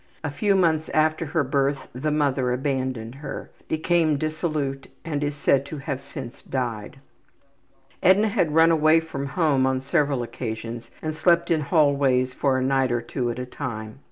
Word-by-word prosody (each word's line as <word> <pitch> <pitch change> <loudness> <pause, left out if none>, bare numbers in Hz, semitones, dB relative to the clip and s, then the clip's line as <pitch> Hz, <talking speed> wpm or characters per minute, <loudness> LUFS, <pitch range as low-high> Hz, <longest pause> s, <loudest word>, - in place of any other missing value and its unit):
A 150 - -2
few 200 +7 +1
months 160 -4 +2
after 155 +1 +2
her 160 0 +1
birth 140 +1 0
the 130 +5 -2
mother 140 -4 +1
abandoned 130 -3 -2
her, 150 - -6 0.2
became 160 -1 +2
dissolute 155 -3 -2 0.2
and 150 -3 -2
is 145 0 -2
said 140 -1 +2
to 155 - -6
have 140 -1 -4
since 135 -3 -8
died. 120 -4 -4 1.0
Edna 205 +4 +5
had 175 -8 0
run 165 +1 +6
away 155 0 +5
from 140 -4 -5
home 140 -4 +2
on 130 0 +1
several 140 -1 0
occasions 115 0 -6
and 155 0 -2
slept 170 +2 +2
in 160 -2 +3
hallways 140 -4 +2
for 135 0 +1
a 130 - 0
night 135 -1 +2
or 120 - +1
two 125 -1 -3
at 120 - -4
a 125 - -4
time. 115 -4 -6
140 Hz, 170 wpm, -24 LUFS, 130-155 Hz, 1.0 s, run